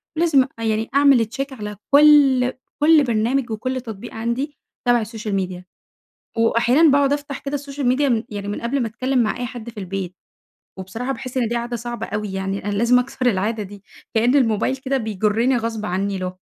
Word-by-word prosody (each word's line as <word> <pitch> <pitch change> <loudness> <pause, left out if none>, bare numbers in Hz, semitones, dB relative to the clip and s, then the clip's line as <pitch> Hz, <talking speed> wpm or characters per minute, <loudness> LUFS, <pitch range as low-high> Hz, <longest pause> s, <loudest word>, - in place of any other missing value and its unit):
لازم 310 -6 +4
يعني 220 -1 0
أ - - +3
أعمل 275 -6 +5
check 275 0 -2
على 210 -4 -7
كل 280 -4 +6 0.3
كل 305 0 +6
برنامج 235 +1 0
وكل 255 +4 -3
تطبيق 225 -1 -8
عندي 235 +6 -3 0.3
تبع 240 -1 +4
ال - - -3
الsocial 220 -1 -6
media، 180 -1 -6 0.7
وأحيانًا 240 +7 +4
باقعد 280 0 +3
أفتح 285 -1 -4
كده 285 +1 -3
الsocial 280 -1 -6
media 250 -3 +2
يعني 205 -1 -6
من 205 - -4
قبل 250 +3 -1
ما 230 - 0
أتكلّم 255 +4 -1
مع 215 - -1
أي 245 - -3
حد 235 -1 -7
في 220 -3 -9
البيت. 185 -1 -5 0.6
وبصراحة 225 +8 -4
باحس 260 -1 -6
إن 240 -3 +1
دي 240 - -2
عادة 240 +1 -2
صعبة 240 +1 -5
أوي؛ 210 0 -3
يعني 195 +1 -3
أنا 205 - -1
لازم 235 +4 +4
أكسر 255 0 -3
العادة 215 0 +1
دي 200 0 -12 0.3
كأن 240 +4 +3
الموبايل 245 0 +2
كده 265 +1 -1
بيجرني 220 +3 +1
غصب 225 -2 -3
عنّي 195 +2 -1
له. 185 0 -5
235 Hz, 190 wpm, -21 LUFS, 210-265 Hz, 0.7 s, كل